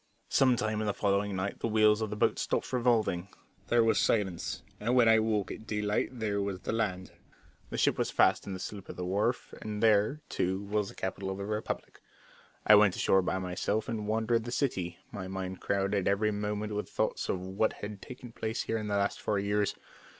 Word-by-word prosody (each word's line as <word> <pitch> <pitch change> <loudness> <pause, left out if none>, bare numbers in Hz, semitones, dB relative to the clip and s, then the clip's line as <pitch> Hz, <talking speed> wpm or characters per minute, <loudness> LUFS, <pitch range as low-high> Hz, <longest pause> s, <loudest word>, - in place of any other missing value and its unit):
Some 130 -2 +4
time 110 -1 -1
in 110 - -1
the 105 - 0
following 100 0 +1
night 95 +2 -3
the - - -1
wheels 110 -1 +4
of 110 - -1
the 105 - -4
boat 105 - +1
stopped - - -1
revolving 115 -7 +2 0.4
there 120 -1 +4
was 110 -2 +3
silence; 95 -6 0 0.2
and 120 +4 +1
when 120 -2 +6
I 110 0 +6
woke 110 -2 0
at 110 - -8
daylight 105 -1 0
there 110 -5 -2
was 100 -2 -3
the - - -3
land. 95 -5 -2 0.6
The - - -4
ship - - +2
was - - +1
fast - - +3
in 100 - -3
the 95 - -5
slip 100 0 -7
at - - -6
the 90 - -4
wharf, 105 +7 -1
and 105 0 -4
there, 110 +7 +3
too, 95 +2 -1
was 105 0 -1
the - - -12
capital 95 0 -3
of 95 - -3
the 100 - -4
republic. 105 +1 -4 0.6
I 105 - +8
went 105 -3 +6
ashore 95 - +3
by 95 - -1
myself 95 +4 -1
and 110 -3 -3
wandered 110 +2 +2
into 115 - -5
the 120 - -5
city, 90 - -1
my 95 -2 -5
mind 95 0 -5
crowded 100 -1 0
every 105 +2 +2
moment 105 +1 -2
with 105 0 -2
the - - -20
thoughts - - -1
of 95 - 0
what 95 +4 0
had 105 -1 -7
taken 125 -2 -10
place 110 -1 -3
here 115 - -1
in 105 - -4
the 100 -1 0
last 100 0 0
four 105 - 0
years. 100 +1 0
105 Hz, 220 wpm, -30 LUFS, 100-110 Hz, 0.6 s, I